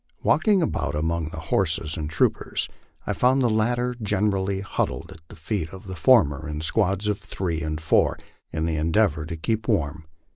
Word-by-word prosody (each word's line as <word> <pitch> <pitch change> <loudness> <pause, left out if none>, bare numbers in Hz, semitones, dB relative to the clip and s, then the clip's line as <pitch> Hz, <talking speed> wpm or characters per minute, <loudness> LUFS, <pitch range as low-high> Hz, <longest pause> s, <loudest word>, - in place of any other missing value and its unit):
Walking 200 -5 +3
about 110 - -1
among 80 +1 -1
the 85 - -9 0.2
horses 80 -4 +1
and 75 -3 -4
troopers, 85 - 0 0.4
I - - -1
found 130 +2 +3
the 120 - +3
latter 120 +3 +1
generally 100 -2 0
huddled 100 - -3
at - - -12
the - - -12
feet 80 0 -3
of 95 +3 -11
the 95 -1 -6
former 80 - +4
in 75 0 -4
squads 100 +3 +1
of 105 -1 0
three 95 -5 -3
and 75 -1 -3
four, 80 - +2 0.3
in 80 0 -1
the 80 -1 -1
endeavor 80 -1 +1
to 80 0 -5
keep 110 +7 -2
warm. 80 - -1
90 Hz, 180 wpm, -24 LUFS, 80-105 Hz, 0.4 s, former